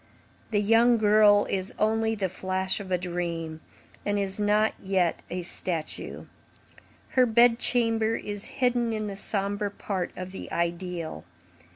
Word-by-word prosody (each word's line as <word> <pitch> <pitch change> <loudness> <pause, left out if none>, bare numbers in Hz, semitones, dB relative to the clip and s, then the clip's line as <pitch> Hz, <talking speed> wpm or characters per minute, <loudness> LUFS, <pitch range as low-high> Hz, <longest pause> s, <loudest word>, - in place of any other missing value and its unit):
The 210 - +1
young 230 +3 +4
girl 210 -1 +5
is 190 -1 -2
only 225 +1 +1
the 200 -3 -1
flash 185 +1 -2
of 195 -2 -8
a 180 - +2
dream, 170 -3 -4 0.4
and 205 0 0
is 195 0 -2
not 210 +1 +2
yet 190 -3 0
a 180 0 -4
statue. 170 -2 -4 0.8
Her 255 -1 +3
bed 235 +1 +5
chamber 225 -2 +3
is 205 -1 -4
hidden 245 -3 0
in 215 -1 -2
the 200 -1 -5
sombre 200 +1 -1
part 195 -2 -3
of 185 0 -6
the 190 - -8
ideal. 170 - -3
200 Hz, 145 wpm, -27 LUFS, 185-220 Hz, 0.8 s, girl